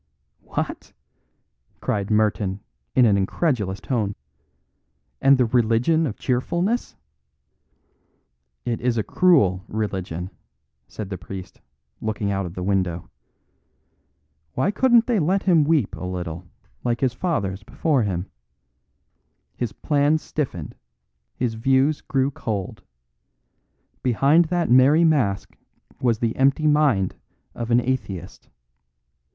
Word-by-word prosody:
"What?" -, -, -5 dB, 0.9 s
cried 100 Hz, -1 st, -2 dB
Merton 105 Hz, -2 st, +1 dB, 0.3 s
in 125 Hz, -, +6 dB
an 105 Hz, -3 st, +4 dB
incredulous 100 Hz, -, -1 dB
tone. 105 Hz, -6 st, -2 dB, 1.1 s
"And 135 Hz, 0 st, +6 dB
the 125 Hz, -, +3 dB
Religion 120 Hz, +7 st, +2 dB
of 110 Hz, -, -5 dB
Cheerfulness 175 Hz, -, -1 dB, 0.8 s
" 60 Hz, 0 st, -46 dB
"It 115 Hz, -, -5 dB
is 120 Hz, -1 st, 0 dB
a 110 Hz, -, +1 dB
cruel 105 Hz, -, +3 dB
religion," 95 Hz, -4 st, -4 dB, 0.6 s
said 105 Hz, -2 st, -7 dB
the 95 Hz, -, -4 dB
priest, 95 Hz, 0 st, -9 dB, 0.4 s
looking 105 Hz, -2 st, -2 dB
out 95 Hz, -2 st, -1 dB
of 85 Hz, -, -10 dB
the 90 Hz, -, -4 dB
window. 90 Hz, -3 st, -1 dB, 1.4 s
"Why 150 Hz, +10 st, +1 dB
couldn't 240 Hz, +1 st, +4 dB
they 235 Hz, -4 st, +1 dB
let 185 Hz, +5 st, +1 dB
him 170 Hz, -5 st, +4 dB
weep 150 Hz, -8 st, +1 dB
a -, -, -8 dB
little, 90 Hz, -1 st, -5 dB, 0.4 s
like 120 Hz, -1 st, -1 dB
his 130 Hz, -3 st, +2 dB
fathers 105 Hz, -, -2 dB
before 140 Hz, +5 st, 0 dB
him? 95 Hz, -4 st, -2 dB, 1.3 s
His 120 Hz, -4 st, -3 dB
plans 145 Hz, +5 st, +1 dB
stiffened, 95 Hz, -, -4 dB, 0.6 s
his 120 Hz, -2 st, -1 dB
views 135 Hz, +6 st, +2 dB
grew 135 Hz, 0 st, 0 dB
cold; 105 Hz, -8 st, -4 dB, 1.2 s
behind 140 Hz, +7 st, +4 dB
that 175 Hz, +1 st, 0 dB
merry 135 Hz, +6 st, +6 dB
mask 135 Hz, -12 st, +1 dB, 0.5 s
was 120 Hz, -3 st, +2 dB
the 115 Hz, 0 st, -1 dB
empty 135 Hz, +3 st, +3 dB
mind 145 Hz, -11 st, +3 dB, 0.4 s
of 115 Hz, -, -5 dB
the 120 Hz, +1 st, +2 dB
atheist. 110 Hz, -9 st, -4 dB
120 Hz, 115 wpm, -23 LUFS, 95-145 Hz, 1.4 s, in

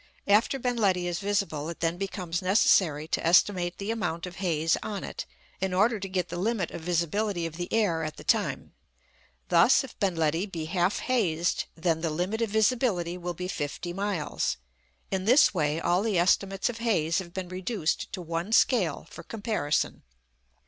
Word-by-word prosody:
After 210 Hz, +6 st, +3 dB
Ben 245 Hz, -1 st, -1 dB
Ledi 190 Hz, -5 st, +2 dB
is 175 Hz, -1 st, -2 dB
visible, 195 Hz, -7 st, -1 dB
it 170 Hz, -, -7 dB
then 165 Hz, +1 st, 0 dB
becomes 180 Hz, -4 st, -3 dB
necessary 180 Hz, -5 st, +3 dB
to -, -, -1 dB
estimate 175 Hz, +1 st, +3 dB
the 200 Hz, +2 st, -3 dB
amount 175 Hz, -7 st, -2 dB
of 180 Hz, 0 st, -9 dB
haze 165 Hz, -4 st, +1 dB
on 210 Hz, -3 st, -4 dB
it, -, -, -6 dB, 0.3 s
in 190 Hz, -1 st, -1 dB
order 215 Hz, +3 st, +3 dB
to 195 Hz, 0 st, -5 dB
get 180 Hz, -2 st, -1 dB
the 175 Hz, -, -4 dB
limit 205 Hz, -2 st, -1 dB
of -, -, -7 dB
visibility 175 Hz, +2 st, 0 dB
of 165 Hz, -1 st, -5 dB
the 175 Hz, +1 st, -5 dB
air 200 Hz, -8 st, +2 dB
at 155 Hz, -1 st, -5 dB
the -, -, -10 dB
time. -, -, 0 dB, 0.8 s
Thus, -, -, +5 dB
if -, -, -11 dB
Ben 190 Hz, -3 st, +1 dB
Ledi 165 Hz, +4 st, 0 dB
be 165 Hz, -5 st, -5 dB
half 175 Hz, +3 st, 0 dB
hazed, 180 Hz, -10 st, 0 dB
then 165 Hz, -1 st, 0 dB
the 165 Hz, -, 0 dB
limit 180 Hz, +8 st, -2 dB
of 230 Hz, -, +1 dB
visibility 215 Hz, -5 st, +1 dB
will 175 Hz, -1 st, -5 dB
be 180 Hz, +2 st, -4 dB
fifty 175 Hz, +1 st, -4 dB
miles. 180 Hz, -, -2 dB, 0.5 s
In 190 Hz, -1 st, -1 dB
this 250 Hz, +3 st, +6 dB
way 155 Hz, -3 st, 0 dB
all 175 Hz, +2 st, +2 dB
the 210 Hz, -3 st, 0 dB
estimates 195 Hz, +2 st, +2 dB
of 235 Hz, -2 st, -4 dB
haze 180 Hz, -9 st, +1 dB
have 175 Hz, -2 st, -8 dB
been 185 Hz, 0 st, -5 dB
reduced 185 Hz, -2 st, -2 dB
to 185 Hz, -, -5 dB
one 170 Hz, +4 st, -3 dB
scale 195 Hz, -, +3 dB
for -, -, -9 dB
comparison. 210 Hz, -10 st, -2 dB
180 Hz, 185 wpm, -27 LUFS, 170-205 Hz, 0.8 s, this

